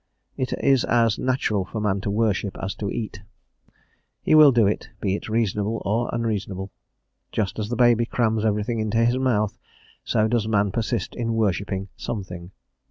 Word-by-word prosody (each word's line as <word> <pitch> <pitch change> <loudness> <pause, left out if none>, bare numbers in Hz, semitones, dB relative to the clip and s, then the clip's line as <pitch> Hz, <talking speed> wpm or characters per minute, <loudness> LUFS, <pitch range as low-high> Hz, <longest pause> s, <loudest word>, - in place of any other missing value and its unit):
It 130 - -2
is 135 -2 +3
as 115 -3 +2
natural 125 -6 0
for 110 +4 -6
man 100 -2 0
to 100 - -3
worship 105 -2 0
as 95 +1 -3
to 100 - -4
eat. 105 -3 -5 1.0
He - - +2
will 155 -2 +9
do 120 -4 +4
it, 100 - -1
be 95 -2 0
it 105 - -4
reasonable 110 0 0
or 115 +4 0
unreasonable. 100 -4 -3 0.6
Just 105 0 -2
as 105 0 -3
the 120 - -1
baby 120 -1 +4
crams 110 -3 0
everything 110 +1 0
into 110 +1 +1
his 120 +2 +2
mouth, 110 -6 0 0.4
so 110 0 +1
does 110 -1 0
man 105 -2 +2
persist 115 +2 -2
in 115 -1 -2
worshipping 100 -2 -1
something. 90 -5 -6
110 Hz, 165 wpm, -24 LUFS, 100-115 Hz, 1.0 s, will